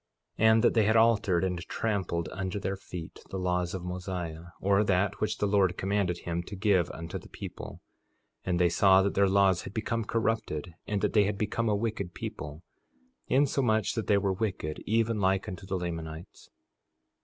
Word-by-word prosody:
4:22 110 Hz, -, +3 dB
And 110 Hz, +1 st, +5 dB
that -, -, +4 dB
they 110 Hz, -3 st, +3 dB
had 110 Hz, +2 st, +3 dB
altered 110 Hz, -6 st, +4 dB
and 90 Hz, -2 st, -1 dB
trampled 95 Hz, -7 st, -1 dB
under 95 Hz, +1 st, -3 dB
their 95 Hz, -1 st, -2 dB
feet 90 Hz, -3 st, -8 dB
the 95 Hz, -, -4 dB
laws 90 Hz, -1 st, -1 dB
of 90 Hz, -, -5 dB
Mosiah, 90 Hz, -2 st, -5 dB
or 100 Hz, +1 st, +3 dB
that 100 Hz, 0 st, +1 dB
which 110 Hz, 0 st, 0 dB
the -, -, 0 dB
Lord 100 Hz, -3 st, +2 dB
commanded 95 Hz, -2 st, 0 dB
him 85 Hz, 0 st, -2 dB
to 100 Hz, +4 st, -8 dB
give 95 Hz, -3 st, +2 dB
unto 80 Hz, +1 st, -6 dB
the -, -, -15 dB
people; -, -, -8 dB, 0.6 s
and 90 Hz, -2 st, 0 dB
they 90 Hz, -, +5 dB
saw 95 Hz, +2 st, +5 dB
that 100 Hz, -, 0 dB
their 100 Hz, 0 st, +3 dB
laws 95 Hz, -2 st, +4 dB
had 100 Hz, -, -9 dB
become 115 Hz, +1 st, -1 dB
corrupted, 110 Hz, -8 st, -1 dB
and 105 Hz, -2 st, -1 dB
that -, -, 0 dB
they 105 Hz, -2 st, +5 dB
had 100 Hz, 0 st, -1 dB
become 110 Hz, +2 st, -1 dB
a 105 Hz, -, +2 dB
wicked 100 Hz, -5 st, -3 dB
people, 75 Hz, +2 st, -6 dB, 0.6 s
insomuch 130 Hz, -6 st, +2 dB
that 115 Hz, -3 st, -3 dB
they 100 Hz, -, +4 dB
were 100 Hz, -1 st, +1 dB
wicked 95 Hz, -7 st, -3 dB
even 115 Hz, 0 st, +1 dB
like 95 Hz, +2 st, +1 dB
unto 95 Hz, -1 st, -7 dB
the 95 Hz, -1 st, -1 dB
Lamanites. 80 Hz, -2 st, -6 dB
95 Hz, 190 wpm, -29 LUFS, 90-105 Hz, 0.6 s, And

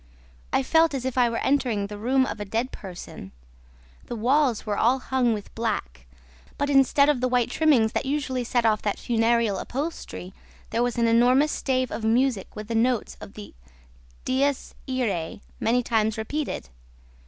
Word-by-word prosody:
I 270 Hz, -, +2 dB
felt 320 Hz, +1 st, +3 dB
as 260 Hz, -2 st, -4 dB
if 260 Hz, -, -2 dB
I 245 Hz, -2 st, +4 dB
were 230 Hz, -, -2 dB
entering 245 Hz, -7 st, +1 dB
the 205 Hz, +1 st, -7 dB
room 260 Hz, +4 st, +2 dB
of 225 Hz, -, -5 dB
a -, -, -2 dB
dead 225 Hz, +5 st, -2 dB
person. 175 Hz, -, -9 dB, 0.8 s
The 240 Hz, -, -4 dB
walls 250 Hz, +1 st, +2 dB
were 210 Hz, -2 st, -1 dB
all 245 Hz, +5 st, +3 dB
hung 255 Hz, -2 st, 0 dB
with 210 Hz, -2 st, -5 dB
black, 60 Hz, -, -3 dB, 0.5 s
but, 285 Hz, 0 st, 0 dB
instead 275 Hz, +1 st, +4 dB
of 290 Hz, -4 st, +2 dB
the 255 Hz, -, +2 dB
white 245 Hz, -2 st, +1 dB
trimmings 270 Hz, -9 st, +3 dB
that 270 Hz, -, -2 dB
usually 265 Hz, -3 st, -1 dB
set 240 Hz, 0 st, 0 dB
off 215 Hz, -2 st, +2 dB
that 205 Hz, -, -1 dB
funereal 230 Hz, -3 st, +1 dB
upholstery, 270 Hz, -, -5 dB, 0.4 s
there 230 Hz, -, 0 dB
was 245 Hz, 0 st, 0 dB
an 235 Hz, -, +3 dB
enormous 250 Hz, +6 st, +4 dB
stave 255 Hz, -2 st, -1 dB
of 225 Hz, -, -5 dB
music 230 Hz, -2 st, +1 dB
with 215 Hz, 0 st, -7 dB
the 230 Hz, -, -3 dB
notes 235 Hz, +1 st, +1 dB
of 200 Hz, -, -11 dB
the 210 Hz, -, -10 dB, 0.7 s
DIES 275 Hz, +1 st, 0 dB, 0.2 s
IRAE, 205 Hz, -10 st, -2 dB, 0.2 s
many 245 Hz, +2 st, +2 dB
times 220 Hz, -2 st, +1 dB
repeated. 245 Hz, -, -4 dB
240 Hz, 175 wpm, -25 LUFS, 220-265 Hz, 0.8 s, I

